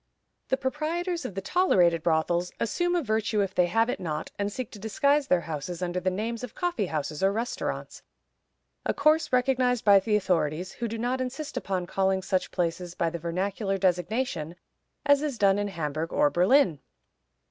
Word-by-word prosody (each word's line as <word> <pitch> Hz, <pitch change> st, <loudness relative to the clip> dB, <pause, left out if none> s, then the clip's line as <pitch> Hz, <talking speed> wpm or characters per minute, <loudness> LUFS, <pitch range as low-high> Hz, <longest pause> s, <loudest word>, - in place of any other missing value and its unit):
The 265 Hz, -, +1 dB
proprietors 320 Hz, +5 st, -2 dB
of 205 Hz, -, -5 dB
the 195 Hz, -, -4 dB
tolerated 180 Hz, -, +3 dB
brothels 170 Hz, +2 st, +1 dB
"assume 350 Hz, +9 st, 0 dB
a 345 Hz, -, +1 dB
virtue 215 Hz, -2 st, 0 dB
if 195 Hz, -1 st, -1 dB
they 180 Hz, -, +3 dB
have 225 Hz, +5 st, +2 dB
it 250 Hz, -, -2 dB
not," 160 Hz, -4 st, -4 dB
and 200 Hz, 0 st, -1 dB
seek 255 Hz, +1 st, -5 dB
to 210 Hz, -, -10 dB
disguise 280 Hz, +7 st, +1 dB
their 180 Hz, -, +3 dB
houses 165 Hz, +3 st, -5 dB
under 180 Hz, 0 st, -1 dB
the 185 Hz, +1 st, 0 dB
names 225 Hz, +5 st, -3 dB
of 250 Hz, -, -7 dB
coffee 350 Hz, -, -1 dB
houses 150 Hz, -2 st, -3 dB
or 195 Hz, +1 st, +4 dB
restaurants; 230 Hz, +4 st, -4 dB, 0.8 s
a -, -, -1 dB
course 310 Hz, +2 st, +3 dB
recognized 250 Hz, -1 st, +2 dB
by 200 Hz, -1 st, +8 dB
the 210 Hz, +2 st, 0 dB
authorities, 180 Hz, -3 st, 0 dB
who 235 Hz, -, -4 dB
do 225 Hz, +1 st, -4 dB
not 245 Hz, +3 st, -1 dB
insist 260 Hz, +4 st, -5 dB
upon 185 Hz, -2 st, -2 dB
calling 190 Hz, +1 st, 0 dB
such 185 Hz, 0 st, 0 dB
places 175 Hz, 0 st, -2 dB
by 165 Hz, -1 st, 0 dB
the 170 Hz, -, -5 dB
vernacular 195 Hz, +4 st, -2 dB
designation, 180 Hz, -2 st, -1 dB, 0.5 s
as 285 Hz, -1 st, +5 dB
is 295 Hz, -5 st, -2 dB
done 200 Hz, -1 st, +4 dB
in 205 Hz, -, -1 dB
Hamburg 160 Hz, -3 st, -3 dB
or 145 Hz, -, +3 dB
Berlin. 180 Hz, -, +4 dB
200 Hz, 180 wpm, -27 LUFS, 175-250 Hz, 0.8 s, by